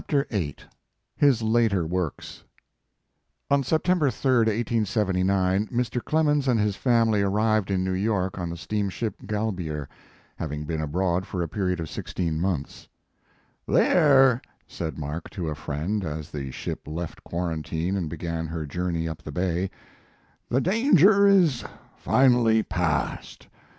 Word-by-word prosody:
129 120 - 0
VIII, - - -18 0.5
HIS 140 -6 +3
LATER 110 -5 +2
WOKKS, 90 -2 -4 1.1
On 140 0 +4
September 160 +2 +2
3, 130 0 +1
1879, 100 -3 +1
Mr. 125 0 -2
Clemens 150 -3 +1
and 120 -3 +3
his 105 -1 +1
family 115 -4 +2
arrived 105 +1 +1
in 95 -1 0
New 95 0 -1
York 95 -1 -1
on 85 -1 -3
the 85 - -5
steamship 105 +5 -2
Galbier, 90 -9 -3 0.5
having 75 -2 -4
been 80 +1 -2
abroad 90 +4 -1
for 90 -3 -2
a - - -3
period 90 0 -1
ot 80 - -4
sixteen 80 0 -3
months. 85 -6 -3 0.8
"There," 135 -7 +5 0.2
said 80 -4 -5
Mark, 75 +2 -5
to 85 -4 -4
a - - -2
friend, 80 +7 -3
as 75 -2 -5
the 70 -3 -5
ship 65 - -6
left 80 +2 -6
quarantine 85 +1 -2
and 90 -5 -2
began 85 0 -4
her 80 -1 -4
journey 85 +2 -2
up 80 +1 -6
the 75 - -8
bay, 90 +3 -1 0.8
"the 130 - +2
danger 200 - +5
is 175 -11 +4 0.3
finally 120 -4 +3
passed. 85 -6 -2
95 Hz, 135 wpm, -25 LUFS, 85-120 Hz, 1.1 s, There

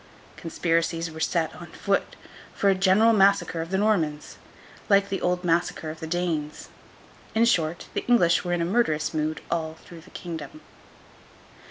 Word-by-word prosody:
Conspiracies 165 0 -1
were 160 - -9
set 160 0 0
on 170 - -10
foot 200 +3 -2 0.4
for 200 -2 +3
a - - +4
general 195 +4 +4
massacre 195 -4 +3
of 165 - -6
the 190 - 0
Normans, 170 -8 0 0.5
like 200 -1 +4
the 195 - -3
old 180 0 0
massacre 170 -2 0
of 155 - -11
the 160 - -6
Danes. 160 -3 -3 0.7
In 225 +1 +4
short, 170 -7 +1
the - - -2
English 175 -9 +4
were 175 - -3
in 170 -1 0
a - - 0
murderous 170 -7 0
mood 155 0 -2
all 160 -1 -2
through 170 -2 -12
the 185 - -17
kingdom. 160 -5 -8
170 Hz, 165 wpm, -25 LUFS, 160-195 Hz, 0.7 s, a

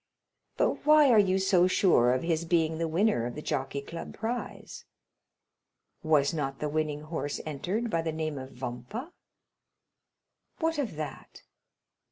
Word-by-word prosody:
"But - - +1
why 300 -3 +6
are 220 - +6
you 190 -2 +3
so 190 -2 +4
sure 175 -10 +4
of 130 0 0
his 165 -1 0
being 165 -1 +1
the 165 - 0
winner 165 - +1
of 120 - -7
the 150 - -6
Jockey 135 +1 -2
Club 165 +4 -8
prize?" 235 +2 -5 1.2
"Was 155 -2 +3
not 135 -4 -2
the 150 - -2
winning 150 -1 -1
horse 155 -2 -4
entered 185 +10 -2
by 165 - +1
the 165 0 -2
name 155 -2 -3
of 130 0 -8
Vampa?" 125 - -6 1.4
"What 325 -1 0
of 240 - -2
that?" 150 -3 -7
160 Hz, 150 wpm, -29 LUFS, 145-195 Hz, 1.4 s, why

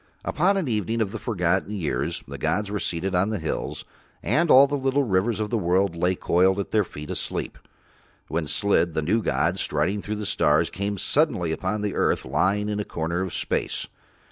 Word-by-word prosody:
Upon 195 +5 +2
an 185 -6 -1
evening 110 0 -1
of 105 -3 0
the 110 - -5
forgotten 95 -2 0
years 85 -7 -2
the - - -8
gods 105 0 -1
were 105 - -1
seated 90 +2 -2
on 90 +3 +2
the 110 - -1
hills, 80 -3 -4 0.4
and 170 +1 +2
all 135 +1 +9
the 140 - -5
little 135 0 +1
rivers 105 0 +1
of 105 -1 -2
the 115 - +1
world 90 0 +1
lay 90 +2 +1
coiled 95 +3 +2
at 100 - -4
Their 105 -1 +3
feet 75 -4 -8
asleep, - - -3 0.7
when 80 -1 -2
Slid, 85 -2 +1
the 80 - 0
new 105 +9 +2
god, - - 0
striding 100 +2 0
through 105 +1 -4
the 105 0 -4
stars, - - +2
came 100 +2 -3
suddenly 95 - +1
upon 105 +5 -2
earth - - +1
lying 105 +3 +1
in 105 0 -2
a - - 0
corner 85 0 -3
of 95 -2 -3
space. - - -2
100 Hz, 195 wpm, -25 LUFS, 90-110 Hz, 0.7 s, all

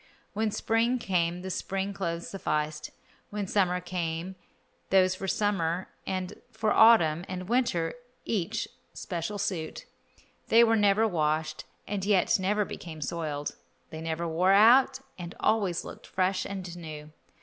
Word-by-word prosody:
When 220 +1 0
spring 225 +4 +1
came 180 -5 -1
the 190 - -4
spring 195 +2 -2
clothes 170 -3 -3
sufficed, 150 -5 -2 0.4
when 205 -1 -3
summer 180 -2 +1
came 175 0 -4 0.5
those 185 -1 +4
for 190 +1 -5
summer, 185 -4 0 0.2
and 185 +1 -4
for 220 -1 0
autumn 175 -8 +6
and 185 -1 -5
winter 205 -9 +1 0.3
each 215 +1 -1 0.3
special 175 +3 -4
suit. 175 -5 -3 0.6
They 230 +1 +6
were 225 -1 +4
never 210 +1 +4
washed, 155 -3 -1 0.2
and 200 -2 -3
yet 200 -1 +3
never 205 +2 +1
became 160 -4 -8
soiled; 150 -2 -3 0.4
they 160 - -6
never 165 +1 -2
wore 180 +4 +3
out, 245 +6 +6 0.2
and 175 -1 -7
always 200 -6 +1
looked - - -10
fresh 185 0 0
and 185 -3 -6
new. 155 -3 -8
185 Hz, 140 wpm, -28 LUFS, 165-205 Hz, 0.6 s, autumn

